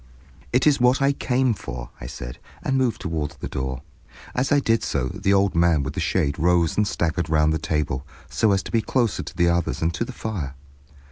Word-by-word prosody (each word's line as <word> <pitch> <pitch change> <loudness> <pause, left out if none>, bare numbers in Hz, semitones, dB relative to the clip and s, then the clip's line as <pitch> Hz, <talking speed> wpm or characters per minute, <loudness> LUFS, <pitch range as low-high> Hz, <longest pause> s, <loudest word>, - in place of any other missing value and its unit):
"It 125 +2 +3
is 145 -4 +4
what 125 +1 +4
I 140 0 +3
came 130 -2 +1
for," 65 - -7
I - - -6
said, - - -7 0.2
and 135 - 0
moved 130 -3 +1
toward 80 -5 -3
the - - -4
door. 65 0 -4 0.5
As 125 +2 0
I 145 - +5
did 115 -4 +2
so, 65 -3 -1
the 95 +7 -1
old 100 -1 +3
man 85 -3 +3
with 65 +2 -4
the - - -4
shade 70 0 0
rose 85 -1 +3
and 105 -1 +2
staggered 85 -2 -1
round 75 0 +3
the 80 - -1
table, 75 -4 -1 0.2
so 110 - +2
as 95 -1 +2
to - - -8
be 115 - +2
closer 120 -2 0
to 90 - -9
the 85 -1 +4
others 85 -7 0
and 80 +1 0
to - - -1
the 120 - -6
fire. 95 - -4
85 Hz, 220 wpm, -23 LUFS, 75-115 Hz, 0.5 s, I